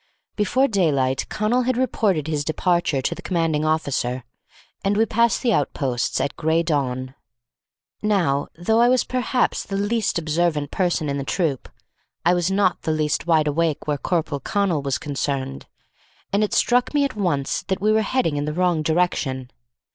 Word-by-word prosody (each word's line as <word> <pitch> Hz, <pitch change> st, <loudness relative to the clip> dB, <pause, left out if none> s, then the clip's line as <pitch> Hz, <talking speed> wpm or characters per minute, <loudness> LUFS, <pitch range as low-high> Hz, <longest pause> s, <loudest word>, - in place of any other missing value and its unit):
Before 255 Hz, +6 st, +2 dB
daylight 140 Hz, -, +1 dB
Connal 220 Hz, +4 st, +1 dB
had 255 Hz, -2 st, +1 dB
reported 210 Hz, -, +1 dB
his 155 Hz, -2 st, -1 dB
departure 160 Hz, -3 st, 0 dB
to -, -, 0 dB
the -, -, -10 dB
commanding 165 Hz, -4 st, 0 dB
officer, 140 Hz, -5 st, -1 dB, 0.6 s
and 200 Hz, +1 st, +1 dB
we 225 Hz, -, +4 dB
passed 235 Hz, +3 st, +1 dB
the 235 Hz, -3 st, +3 dB
outposts 130 Hz, -, -1 dB
at 140 Hz, +2 st, -2 dB
gray 160 Hz, +2 st, +1 dB
dawn. 130 Hz, -5 st, -1 dB, 0.9 s
Now, 180 Hz, -10 st, +1 dB
though 220 Hz, +7 st, +1 dB
I 240 Hz, +1 st, +5 dB
was 255 Hz, -1 st, +3 dB
perhaps 255 Hz, 0 st, 0 dB
the 195 Hz, -, -4 dB
least 205 Hz, 0 st, 0 dB
observant 155 Hz, -2 st, 0 dB
person 175 Hz, -4 st, 0 dB
in 140 Hz, 0 st, -2 dB
the -, -, -3 dB
troop, 150 Hz, -3 st, -1 dB, 0.6 s
I 175 Hz, -, +5 dB
was 175 Hz, 0 st, +1 dB
not 195 Hz, -2 st, +1 dB
the 160 Hz, -, -1 dB
least 155 Hz, 0 st, -1 dB
wideawake 155 Hz, -1 st, +1 dB
where 145 Hz, -2 st, -1 dB
Corporal 160 Hz, -4 st, -1 dB
Connal 190 Hz, -3 st, 0 dB
was 135 Hz, -1 st, -1 dB
concerned, 135 Hz, -1 st, -3 dB, 0.7 s
and 205 Hz, +2 st, +3 dB
it 210 Hz, -, -1 dB
struck 245 Hz, +4 st, +2 dB
me 285 Hz, -1 st, +4 dB
at 275 Hz, -, -4 dB
once 165 Hz, -9 st, -1 dB
that 190 Hz, -, -1 dB
we 210 Hz, +2 st, +2 dB
were 220 Hz, 0 st, +3 dB
heading 215 Hz, -, 0 dB
in 145 Hz, -, -1 dB
the 150 Hz, -, -2 dB
wrong 175 Hz, -1 st, +1 dB
direction. 155 Hz, -6 st, 0 dB
165 Hz, 170 wpm, -22 LUFS, 145-205 Hz, 0.9 s, I